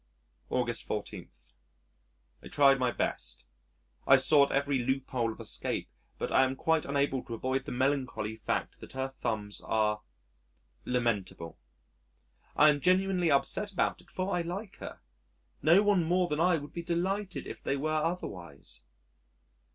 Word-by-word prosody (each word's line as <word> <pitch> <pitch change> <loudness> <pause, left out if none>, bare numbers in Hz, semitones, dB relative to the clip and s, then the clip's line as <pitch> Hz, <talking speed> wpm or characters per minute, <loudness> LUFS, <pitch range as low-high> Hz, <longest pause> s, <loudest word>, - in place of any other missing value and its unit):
August 120 -2 0
14. 105 -3 -5 1.1
I - - -10
tried 140 -2 +5
my 125 -1 +2
best, - - -3 0.6
I've 135 -1 +7
sought 140 +1 +5
every 140 -1 +1
loophole 130 -2 -1
of - - -11
escape, - - -2 0.3
but - - -3
I - - +5
am 130 0 0
quite 160 +3 +1
unable 140 -2 0
to 115 - -5
avoid 130 +3 -2
the - - -5
melancholy 125 -5 -1
fact 110 - -3
that - - -12
her 130 0 -2
thumbs 110 -6 -3
are 105 -1 +1 0.8
lamentable. 105 -9 -2 1.0
I 150 - +7
am 145 -1 -2
genuinely 185 0 +3
upset 140 +8 +1
about 190 - 0
it - - -23
for 185 +1 -2
I 175 - +1
like 190 +4 -6
her. - - -9 0.6
No 170 +7 +6
one 205 -4 +3
more 180 +2 +2
than 150 -2 -2
I 175 0 +4
would 145 -1 -9
be 170 - -4
more 170 0 -2
delighted 190 +2 -2
if - - -8
they 140 - -1
were 155 +3 -1
otherwise.... 100 - -3
140 Hz, 150 wpm, -30 LUFS, 120-170 Hz, 1.1 s, I've